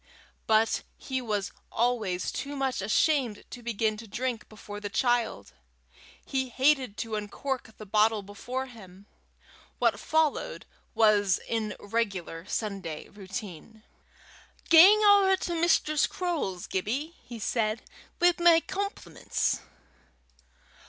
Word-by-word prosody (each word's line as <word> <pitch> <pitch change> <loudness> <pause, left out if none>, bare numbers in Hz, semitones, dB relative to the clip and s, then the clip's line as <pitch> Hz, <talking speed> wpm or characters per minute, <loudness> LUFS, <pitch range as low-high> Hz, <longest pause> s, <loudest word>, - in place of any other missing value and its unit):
But 220 0 +3 0.2
he 260 -1 -3
was 205 -4 -2 0.2
always 220 -7 0
too 285 +1 -5
much 270 -5 -1
ashamed 240 - +1
to 245 - -8
begin 220 -2 -1
to 225 +1 -10
drink 240 +1 -3
before 205 -1 -9
the 205 0 -5
child: 225 - 0 0.7
he 265 -1 -1
hated 260 -4 +2
to 225 -1 -4
uncork 220 +2 -4
the 215 - -9
bottle 215 +1 +2
before 245 +6 -5
him. 200 -6 -14 0.7
What - - +2
followed 315 -2 0 0.3
was 205 -4 +4
in 220 -2 -2
regular 195 -6 -3
Sunday 195 -8 -4
routine. 200 +1 -8 0.9
"Gang 385 +6 +8
ower 400 -2 +6
to 350 - -3
Mistress 325 -3 +2
Croale's, 315 - -3
Gibbie," 255 - -2
he 240 - -9
said, 220 0 -1 0.4
"wi' 350 0 +5
my 345 -1 +7
compliments." 400 +4 -2
225 Hz, 115 wpm, -28 LUFS, 205-275 Hz, 0.9 s, Gang